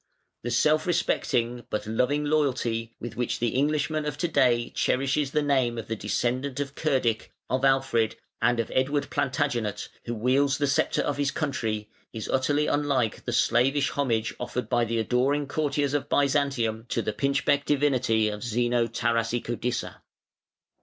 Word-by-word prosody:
The 120 - -4
self 150 +8 +2
respecting 120 -8 0
but 105 0 -2
loving 125 +7 0
loyalty, 125 -6 0
with 120 -1 -7
which 120 0 -1
the 120 - 0
Englishman 150 +4 0
of 150 -1 -4
to 175 - 0
day 125 -6 +2
cherishes 135 +2 +1
the 150 +1 0
name 130 -5 +1
of 110 -2 -5
the 115 - -2
descendant 125 +6 -2
of 140 -1 -3
Cerdic, 130 -8 0 0.2
of 130 +1 0
Alfred, 135 -5 +2 0.3
and 120 +1 +2
of 115 - -2
Edward 140 +2 0
Plantagenet, 135 -6 -1 0.2
who 120 - -3
wields 135 +5 +2
the 145 - +1
sceptre 135 -1 +1
of 145 - -2
his 145 -1 +1
country, 115 -9 -2 0.3
is 110 -2 -5
utterly 145 +3 +1
unlike 140 -7 0
the - - -2
slavish 135 +4 +2
homage 115 -6 0
offered 125 -2 -4
by 120 -2 +2
the 115 +1 -2
adoring 130 +6 +1
courtiers 145 -1 0
of 145 - -1
Byzantium 135 -6 +1
to 115 - -1
the 110 - -2
pinchbeck 140 +1 +1
divinity 130 -6 +2
of 105 -1 -4
Zeno 120 0 +1
Tarasicodissa. 115 +1 -1
130 Hz, 155 wpm, -26 LUFS, 115-145 Hz, 0.3 s, self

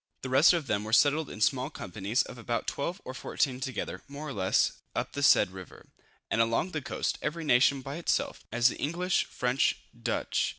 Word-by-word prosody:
The 130 - -4
rest 130 +5 +6
of 170 -4 -1
them 105 -4 -1
were 110 +1 -6
settled 150 +4 +4
in 105 - -9
small 130 +4 +2
companies 105 - -2
of 125 - -10
about 115 +1 -2
12 175 +7 -3
or 130 - -6
14 130 0 -1
together, 130 -7 -4
more 145 +2 -7
or - - -5
less, 95 -4 +1 0.2
up - - -2
the 140 - -3
said 105 -8 +5
river, 95 -1 -12 0.4
and 115 - +3
along 115 +10 +1
the 155 - -3
coast, - - -2
every 165 +2 -3
nation 140 -1 +4
by 140 +4 -5
itself, 170 - -1
as 120 +2 +4
the - - -7
English, 180 +5 0
French, 125 +2 +1 0.2
Dutch, - - -1
&c. - - -2
130 Hz, 205 wpm, -29 LUFS, 115-150 Hz, 0.4 s, rest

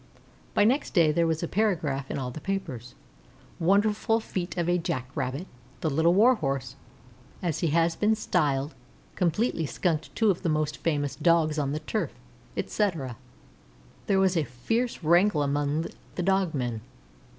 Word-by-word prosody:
Next 245 +6 +2
day 165 -4 +5
there 170 +2 +2
was 160 +1 -1
a - - -1
paragraph 160 -11 0
in - - -3
all 130 -2 -3
the 150 - -8
papers: 160 -12 -4 0.6
"WONDERFUL 210 +5 +2
FEAT 185 -5 -4
OF 170 -1 0
A 175 0 +2
JACKRABBIT. 140 -2 -3 0.4
The 160 - +1
Little 160 +5 +3
Warhorse, 160 - +2 0.7
as 170 -4 -1
he 170 - +1
has 165 +2 +2
been 215 +1 +2
styled, 150 -8 0 0.4
completely 170 - 0
skunked 165 -2 -2
two 220 -3 +4
of 180 - -4
the 175 - 0
most 155 -1 0
famous 145 -4 -1
Dogs 160 -3 +2
on 140 -2 0
the 155 +1 -3
turf," 165 - -2 0.4
etc. 165 - -1 0.9
There 195 -1 +3
was 190 -1 +3
a 165 - +2
fierce 225 - -2
wrangle 170 0 +4
among 145 +3 0 0.3
the 180 - -2
dog 190 -3 +1
men. 120 -4 -2
165 Hz, 150 wpm, -27 LUFS, 145-190 Hz, 0.9 s, day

